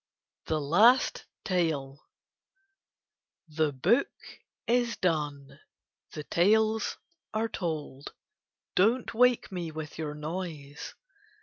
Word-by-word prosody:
THE 155 - 0
LAST 210 - +4 0.2
TALE 155 -7 -1 1.4
The 155 -1 0
book 190 - +2 0.6
is 240 0 +1
done, 145 -5 -2 0.5
the 150 - -5
tales 220 +7 +2 0.4
are 220 +1 +1
told; 155 -8 -5 0.6
Don't 225 +7 +2
wake 245 -1 +3
me 175 -3 -4
with 155 0 -7
your 150 -2 -3
noise. 150 -2 -6
165 Hz, 90 wpm, -29 LUFS, 150-220 Hz, 1.4 s, LAST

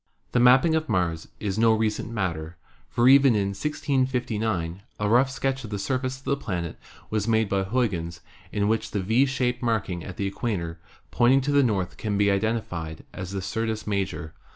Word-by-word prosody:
The 125 - +2
mapping 130 +7 +6
of 160 -1 0
Mars 85 -3 0
is 105 0 -2
no 115 0 +5
recent 110 0 -1
matter, 85 -7 -3 0.3
for 120 0 +2
even 135 -2 +7
in 100 -1 +1
1659 115 - -1 0.2
a 105 - 0
rough 125 +5 +4
sketch 135 0 -2
of 115 - -7
the 105 - -3
surface 130 +5 -2
of 130 - -19
the 140 - +1
planet 90 - -4 0.3
was 105 0 0
made 110 -1 +3
by 100 -1 +1
Huygens 95 -6 -1 0.3
in 100 0 0
which 110 0 0
the 105 - -2
V 115 +8 +3
shaped 125 -2 -1
marking 105 -8 -1
at 95 - -8
the 100 - -1
equator 95 -5 -3 0.3
pointing 130 +3 +4
to 145 +2 -1
the 145 0 +5
north 100 -8 0
can 105 -2 -2
be 100 0 +3
identified 100 -7 -2
as 90 -1 -6
the 95 -1 -3
Syrtis 110 +1 -2
Major. 95 -6 -2
110 Hz, 185 wpm, -25 LUFS, 95-125 Hz, 0.3 s, even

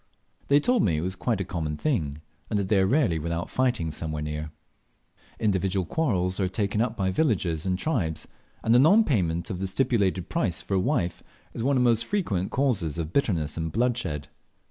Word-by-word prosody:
They 140 +1 +5
told 245 - +2
me 80 -4 +2
it - - -1
was 90 +2 -2
quite 110 +1 -1
a - - 0
common 80 -5 -3
thing, 80 - -1 0.3
and 105 - 0
that 100 -2 -1
they 105 -3 +4
are 95 - +3
rarely 100 - +2
without 85 +2 -3
fighting 120 -11 0
somewhere 75 -1 -4
near. 75 0 -4 0.9
Individual 95 -3 +1
quarrels 95 - 0
are 95 -2 +1
taken 100 +2 -1
up 115 -1 -1
by 95 -1 0
villages 95 - 0
and 90 -1 +1
tribes, 95 - -1 0.4
and 115 - +3
the 120 - +7
nonpayment 125 - +3
of 90 - -4
the 95 - -1
stipulated 95 -4 +1
price 95 - 0
for - - -4
a 95 - +3
wife 90 -1 0 0.3
is - - -5
one 135 +3 +2
of 125 - +3
the - - +4
most 115 -1 0
frequent 105 - -1
causes 105 - 0
of 80 -1 -4
bitterness 85 - 0
and 80 -1 -2
bloodshed. 115 - -1
95 Hz, 195 wpm, -26 LUFS, 85-120 Hz, 0.9 s, the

